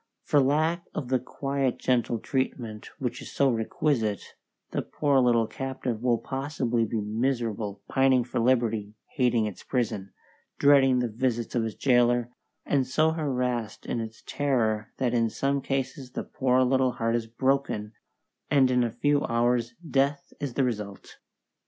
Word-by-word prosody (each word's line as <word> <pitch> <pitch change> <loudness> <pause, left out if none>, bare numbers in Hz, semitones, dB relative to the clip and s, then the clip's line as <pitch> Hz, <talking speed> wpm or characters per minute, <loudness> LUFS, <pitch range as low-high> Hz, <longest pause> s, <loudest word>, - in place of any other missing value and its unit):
For 145 - +3
lack 155 +5 +2
of 135 -6 -4
the 130 -1 +2
quiet 135 +1 -2
gentle 120 -2 +1
treatment 115 -4 -3
which 125 -2 -3
is - - -9
so 140 -1 +3
requisite, 115 - -1 0.4
the - - -1
poor 145 -3 +1
little 120 -2 +4
captive 125 0 -4
will 120 -1 +2
possibly 130 -3 -1
be 110 +1 -2
miserable, 110 -2 -2
pining 135 -2 +3
for 120 0 -3
liberty, 115 -4 +1 0.2
hating 120 -4 +3
its 105 -3 -6
prison, 110 -7 -2 0.5
dreading 135 -2 +5
the 125 - 0
visits 120 +1 -2
of 120 - +1
its 110 - -4
jailor, 120 -2 +3 0.3
and 135 -3 +1
so 155 +4 +2
harassed 125 -8 -2
in 120 - -2
its 110 0 -8
terror 115 -7 0
that 125 -2 0
in 115 -2 +2
some 140 +4 0
cases 135 -1 -3
the - - -3
poor 130 -1 +2
little 130 0 +2
heart 115 -1 0
is 115 -1 -2
broken, 120 -3 -1 0.6
and 135 -3 +4
in 125 -1 +3
a 120 - 0
few 145 +5 +1
hours 120 0 +1
death 140 0 0
is 140 -4 -4
the 135 - +2
result. 105 -5 -4
125 Hz, 155 wpm, -27 LUFS, 115-135 Hz, 0.6 s, dreading